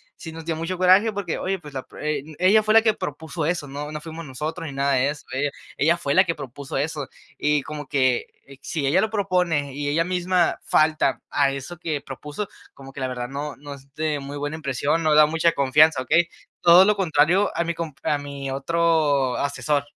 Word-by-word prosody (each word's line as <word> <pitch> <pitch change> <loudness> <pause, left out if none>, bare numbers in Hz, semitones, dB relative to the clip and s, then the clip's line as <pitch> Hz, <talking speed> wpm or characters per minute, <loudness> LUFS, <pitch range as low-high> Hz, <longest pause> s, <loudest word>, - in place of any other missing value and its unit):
sí 165 - -9
nos 165 0 -9
dio 165 -1 -1
mucho 165 +3 -4
coraje, 185 +5 +5
porque 195 -5 -3
oye, 190 +1 -2
pues, 150 -4 -12
la 130 -1 -4
pru - - -14
eh, 150 -2 -2 0.2
ella 200 +4 +5
fue 215 0 +2
la 225 - +8
que 220 -2 +3
propuso 160 +1 -5
eso, 165 -2 -1
no, 145 +2 -6
no 150 - -5
fuimos 160 +1 -8
nosotros 150 +5 -5
ni - - -6
nada 140 +1 +1
de 130 +2 +2
eso. 150 0 -7
Ella 140 +2 0 0.3
ella 165 +4 +3
fue 140 -5 -1
la 185 - +7
que 170 - 0
propuso 140 0 -7
eso, 145 -1 -3 0.3
y 150 -1 +1
como 150 -2 -7
que 130 -3 +1 0.3
si 145 -5 -2
ella 175 +7 +3
lo 220 - 0
propone 180 -9 0
y 145 +1 -3
ella 165 +3 +1
misma 180 0 +1
falta 155 -3 +2
a 140 -1 +2
eso 140 +6 -7
que 155 -4 -2
propuso, 150 +9 -6 0.3
como 135 0 -13
que 135 - -8
la 130 - -1
verdad 125 -1 -4
no, 145 +2 -5
no 145 0 -9
es 140 0 -19
de 155 -1 -1
muy 140 +1 -7
buena 145 +2 -3
impresión, 145 +2 -1
no 155 -1 +3
da 150 0 +8
mucha 165 +2 +2
confianza, 140 +1 +4
¿okey? 170 +6 +2 0.3
Todo 175 +2 +8
lo 210 +1 +3
contrario 180 +1 +2
a 170 - 0
mi 170 - -1
comp 165 -4 -6
a 150 - +1
mi 140 -1 -6
otro 145 -2 +1
asesor. 145 +1 0
150 Hz, 220 wpm, -23 LUFS, 140-170 Hz, 0.3 s, la